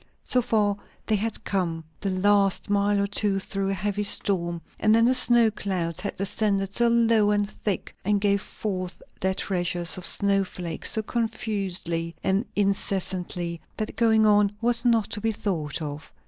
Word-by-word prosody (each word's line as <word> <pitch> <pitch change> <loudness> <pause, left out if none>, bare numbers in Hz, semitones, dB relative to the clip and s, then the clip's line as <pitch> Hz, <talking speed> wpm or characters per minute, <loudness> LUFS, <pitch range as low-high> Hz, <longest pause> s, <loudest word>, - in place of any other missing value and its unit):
So 250 - +1
far 210 -4 +1 0.3
they 220 - +1
had 220 +1 -2
come, 170 -4 -2 0.2
the 200 - -2
last 200 +1 +2
mile 205 0 +2
or 200 - +1
two 200 0 0
through 195 0 -3
a 195 - -1
heavy 205 +1 -2
storm; 175 -4 +1 0.2
and 215 0 +4
then 230 0 +4
the 250 - +4
snow 240 -3 +6
clouds 180 -5 -3
had 200 +2 -4
descended 195 0 0
so 240 +2 +3
low 230 -2 +3
and 205 -1 +1
so - - -16
thick, 205 -4 -3
and 205 +1 +1
gave 200 0 +1
forth 185 -4 -5 0.2
their 190 0 0
treasures 175 -2 0
of 180 - -3
snow 200 +1 +3
flakes 175 -3 -3
so 220 - 0
confusedly 195 -7 -2
and 195 +5 +1
incessantly, 185 -4 -2 0.2
that 215 - -4
going 220 -1 +3
on 205 -1 +4
was 235 0 +2
not 230 -4 +2
to 210 - -5
be 225 +1 0
thought 165 -7 -3
of. 150 +1 -7
200 Hz, 175 wpm, -25 LUFS, 185-215 Hz, 0.3 s, snow